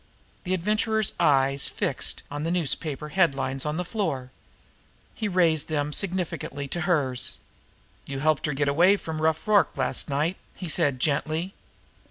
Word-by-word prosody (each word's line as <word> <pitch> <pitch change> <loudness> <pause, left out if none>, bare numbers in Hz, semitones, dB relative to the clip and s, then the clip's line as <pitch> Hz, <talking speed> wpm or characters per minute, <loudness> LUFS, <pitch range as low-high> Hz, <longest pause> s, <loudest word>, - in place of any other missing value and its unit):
The 185 +1 +1
Adventurer's 215 +3 +1
eyes 140 -3 +3
were - - -17
fixed - - -1
on 145 +1 -3
the 165 - -1
newspaper 150 -3 -1
headlines 135 -6 +1
on 150 +1 -1
the 180 - -2
floor. 155 - -2 0.8
He 220 - -2
raised 170 -5 +2
them 150 -2 -1
now - - -6
significantly 175 -6 -3
to 175 - -2
hers. 135 -7 +1 0.7
"You 140 - -4
helped 155 +1 +1
her 150 - -1
to - - -7
get 145 0 +1
away 175 +8 +5
from 160 -4 -5
Rough 160 +6 +1
Rorke 205 -8 +3
last 130 +3 0
night," 150 +6 0 0.2
he 185 - -6
said 140 -3 +1
gently. 155 +6 -1
155 Hz, 165 wpm, -26 LUFS, 140-180 Hz, 0.8 s, away